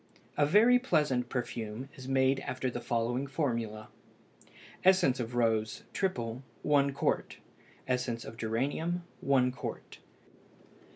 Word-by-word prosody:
A 145 - +3
very 230 +9 +6
pleasant 150 - +1
perfume 120 -1 -4
is 130 -1 -9
made 135 0 +3
after 130 -1 -3
the 120 - -5
following 120 +3 -1
formula: 115 -7 -2 0.9
Essence 185 -9 +4
of 120 0 -4
rose 110 -2 +1
(triple) 125 - -2 0.2
1 140 -1 +3
qt. 135 - -1 0.5
Essence 125 -2 -1
of 110 - -8
geranium 140 +10 -1 0.2
1 130 -2 +3
qt. - - -7
130 Hz, 115 wpm, -31 LUFS, 115-140 Hz, 0.9 s, very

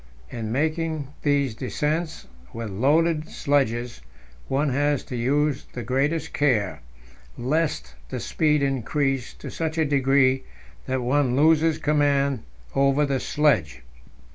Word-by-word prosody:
In 110 -2 -4
making 155 +1 -1
these 140 -4 +1
descents 150 +7 -2 0.3
with 115 -2 -5
loaded 155 - +2
sledges, 125 - 0 0.5
one 140 +2 +1
has 145 +1 +1
to 125 - -7
use 140 +4 0
the 125 - -5
greatest 140 +7 -1
care, 115 -10 +1 0.6
lest 125 - -1 0.2
the - - -4
speed 150 -2 +1
increase 135 0 -1
to - - -8
such 160 0 -3
a 160 - +3
degree 135 -2 +3 0.4
that 130 -1 -1
one 130 0 +2
loses 160 +2 +4
command 140 -4 +1 0.3
over 140 +2 +3
the 135 -2 0
sledge. 130 - +1
140 Hz, 120 wpm, -24 LUFS, 125-150 Hz, 0.6 s, loses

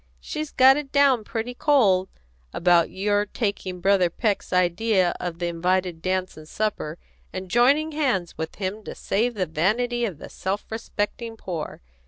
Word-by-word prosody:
She's 305 - -5
got 265 +1 +6
it 290 -2 -5
down 275 -5 +4
pretty 230 +3 -4
cold 215 -10 +3 0.4
about 170 -1 +3
your 205 +1 +1
taking 195 -4 -3
Brother 195 -2 +3
Peck's 205 +3 -1
idea 185 +1 +2
of 175 -2 -4
the 175 - -2
invited 175 0 0
dance 185 +1 -1
and 155 0 -13
supper, 200 -7 -2 0.3
and 185 -1 -6
joining 280 +6 +4
hands 255 - -1
with 160 0 -5
him 200 +2 -4
to - - -7
save 235 +4 0
the 190 -3 0
vanity 220 +10 0
of 190 -9 -4
the - - -10
self 195 +2 -3
respecting 225 +1 -4
poor. 170 -7 -6
195 Hz, 160 wpm, -24 LUFS, 180-235 Hz, 0.4 s, got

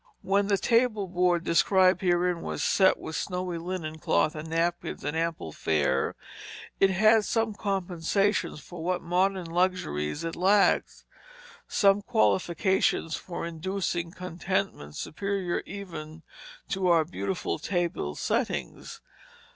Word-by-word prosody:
When 200 +1 +2
the 200 -1 +2
table 230 -3 +2
board 180 -1 +1
described 185 +2 +4
herein 175 -1 +1
was - - -3
set 190 -1 +4
with 160 - -7
snowy 180 0 -3
linen 165 -3 -5
cloth 155 - +2
and 155 +1 -7
napkins, 170 +1 -1
and 145 +2 -2
ample 165 - -2
fare, 75 -4 0 0.6
it 195 - +5
had 215 +3 +4
some 225 +1 0
compensations 195 -2 -1
for 175 -2 -9
what 180 +1 -1
modern 185 +2 +1
luxuries 165 - -1
it 165 0 -3
lacked, 195 +3 +2 0.6
some 200 -1 +3
qualifications 190 -6 +1
for 170 -2 -6
inducing 170 +1 -3
contentment 180 - -3
superior 195 - -2
even 165 -5 -8 0.5
to 190 -1 0
our 165 -2 +4
beautiful 180 +2 -3
table 175 - -2
settings. - - -3
180 Hz, 120 wpm, -27 LUFS, 165-195 Hz, 0.6 s, it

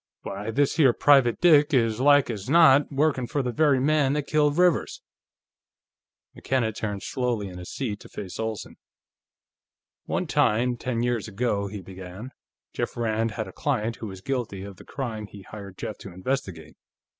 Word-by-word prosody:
Why, 100 +3 -5
this 140 +7 +1
here 135 -6 +5
private 135 -5 +4
dick 150 -4 +5
is 115 -3 +2
like 145 -1 +5
as 105 0 -6
not 145 -3 +6
workin' 140 -3 +1
for 140 +3 -1
the 125 - -2
very 145 0 +3
man 140 0 +2
that 150 -1 -1
killed 150 0 +2
Rivers!" 180 -4 +2 1.3
McKenna 125 -4 -1
turned 105 -2 -4
slowly 120 -6 -2
in 90 -1 -9
his 90 - -9
seat, 110 -7 -4
to - - -14
face 95 0 -8
Olsen. 110 -1 -4 1.3
"One - - -1
time, 120 +3 +2
ten 120 -1 -2
years 120 -4 -1
ago," 105 -1 -1
he 100 0 -7
began, 95 +6 -9 0.4
"Jeff - - -3
Rand 115 -1 0
had 110 -3 -4
a 95 - -10
client 115 -6 -1
who 110 - -6
was 95 -2 -9
guilty 115 -6 -3
of 100 -2 -9
the - - -14
crime 110 -6 -5
he 100 -1 -12
hired 100 -1 -10
Jeff 105 - -6
to 95 - -9
investigate. 95 - -4
115 Hz, 170 wpm, -25 LUFS, 100-135 Hz, 1.3 s, not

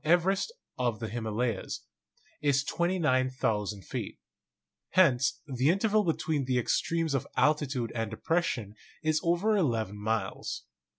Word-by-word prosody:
Everest 180 - +3 0.3
of 120 -3 0
the 115 -2 -4
Hima 110 -1 -3
layas) 115 -2 -2 0.6
is 140 -2 +3
29,000 130 - 0
feet; - - -5 0.8
hence 135 -8 +4
the 135 -1 +1
interval 210 +4 +3
between 160 -4 0
the 125 -1 +1
ex 125 - +2
tremes 165 -3 -1
of 135 0 -1
altitude 140 -6 +2
and 115 -2 -2
depression 115 - -1 0.3
is 155 0 +2
over 175 +6 +2
eleven 115 - 0
miles. 105 -2 -2
135 Hz, 125 wpm, -30 LUFS, 115-170 Hz, 0.8 s, hence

